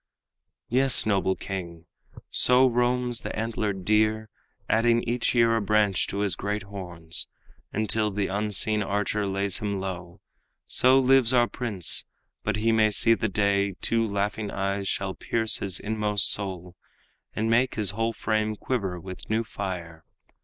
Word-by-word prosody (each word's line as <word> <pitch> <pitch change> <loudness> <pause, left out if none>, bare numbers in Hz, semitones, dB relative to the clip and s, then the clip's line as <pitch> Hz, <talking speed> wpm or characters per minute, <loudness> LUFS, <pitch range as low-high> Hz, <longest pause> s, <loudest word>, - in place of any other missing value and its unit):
"Yes, 130 +1 +2
noble 95 -3 +1
king, 85 -4 -7 0.5
so 125 +1 +4
roams 125 0 +1
the - - -5
antlered 105 -4 -3
deer, 110 +1 +1 0.4
Adding 115 +1 +2
each 120 +1 -1
year 115 -1 +4
a 115 - 0
branch 105 -1 +2
to 100 - -3
his 100 -3 +1
great 105 +2 -3
horns, 90 -5 -3 0.4
Until 110 0 0
the 100 0 -2
unseen 105 +2 0
archer 105 +1 -1
lays 100 +1 -1
him 100 -3 -2
low. 90 -2 -6 0.5
So 130 +1 +4
lives 130 -2 +5
our 120 -1 +4
prince; 105 -12 -1 0.4
but 110 - -1
he 110 +2 +1
may 110 -1 +4
see 115 +2 +3
the 110 -1 -1
day 100 -1 +1
Two 115 0 +1
laughing 100 0 -2
eyes 100 0 -2
shall 95 0 -2
pierce 110 +2 -1
his 95 -2 +1
inmost 105 -2 +2
soul, 90 -3 -3 0.6
And 110 - -1
make 120 +3 +2
his 105 -3 +2
whole 115 +2 -1
frame 110 -1 -1
quiver 100 -7 -3
with 95 +1 -10
new 110 +1 +1
fire. 90 -7 -6
105 Hz, 150 wpm, -26 LUFS, 95-115 Hz, 0.6 s, lives